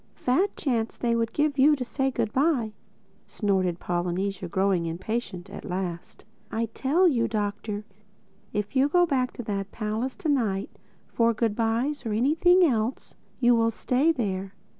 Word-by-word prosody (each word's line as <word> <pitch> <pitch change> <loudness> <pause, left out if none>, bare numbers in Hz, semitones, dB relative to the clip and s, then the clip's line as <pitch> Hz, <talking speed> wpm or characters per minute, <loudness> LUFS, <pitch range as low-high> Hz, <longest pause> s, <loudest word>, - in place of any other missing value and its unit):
"A - - -29
fat 320 +11 +1
chance 230 -5 -1
they 235 -1 +1
would 230 -1 0
give 295 -2 0
you 295 +3 +6
to 255 -3 -4
say 270 +2 0
good 230 -4 -2
bye!" 260 -6 +1 0.5
snorted 185 -4 0
Polynesia 180 +2 -2
growing 190 -2 +1
impatient 185 +2 -4
at - - -8
last. 180 -3 -5 0.3
"I 225 0 -1
tell 325 +8 +3
you, 235 -8 +2
Doctor, 210 -1 -3 0.7
if 210 +3 -3
you 270 +2 +4
go 355 +3 +4
back 260 -6 0
to 245 - -6
that 200 -2 -3
palace 220 +4 -3
tonight, 240 - 0 0.4
for 230 -1 +2
goodbys 230 +6 0
or 225 -3 -2
anything 320 - +4
else, 235 -3 -1 0.3
you 245 -1 +5
will 230 -1 +3
stay 255 +7 +1
there. 195 -8 -3
230 Hz, 155 wpm, -26 LUFS, 200-265 Hz, 0.7 s, you